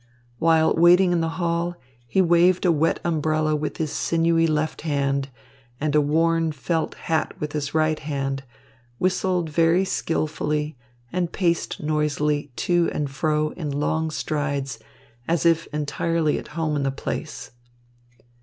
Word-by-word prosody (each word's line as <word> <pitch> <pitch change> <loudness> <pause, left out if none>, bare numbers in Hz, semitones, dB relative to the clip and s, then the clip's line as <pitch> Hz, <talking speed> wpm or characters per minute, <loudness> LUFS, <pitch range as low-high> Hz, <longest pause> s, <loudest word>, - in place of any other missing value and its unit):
While 160 -1 +4
waiting 175 +2 +6
in 175 -1 +2
the 165 - 0
hall 170 0 -1 0.3
he 190 +10 +3
waved 175 +2 +4
a 175 - +5
wet 160 +1 +1
umbrella 155 -1 +1
with 150 0 -3
his 155 -2 -2
sinewy 165 0 +2
left 155 0 -1
hand 140 -3 -1 0.5
and 150 0 -1
a 150 - +5
worn 165 +2 +2
felt 160 +3 -2
hat 160 -1 -1
with 150 -1 -3
his 145 0 -3
right 155 0 +2
hand, 135 -2 -3 0.5
whistled 180 -1 0
very 165 +4 +3
skilfully, 150 -4 -1 0.4
and 175 -1 -1
paced 170 -4 -1
noisily 150 -1 0
to 175 -1 +2
and 145 -2 -2
fro 155 +1 0
in 155 -4 -5
long 155 +3 -1
strides, 145 -3 -2 0.5
as 170 0 0
if 165 -1 +3
entirely 155 +1 -1
at - - -10
home 160 -2 0
in 145 - 0
the 135 - +1
place. 135 - -5
155 Hz, 145 wpm, -23 LUFS, 150-170 Hz, 0.5 s, waiting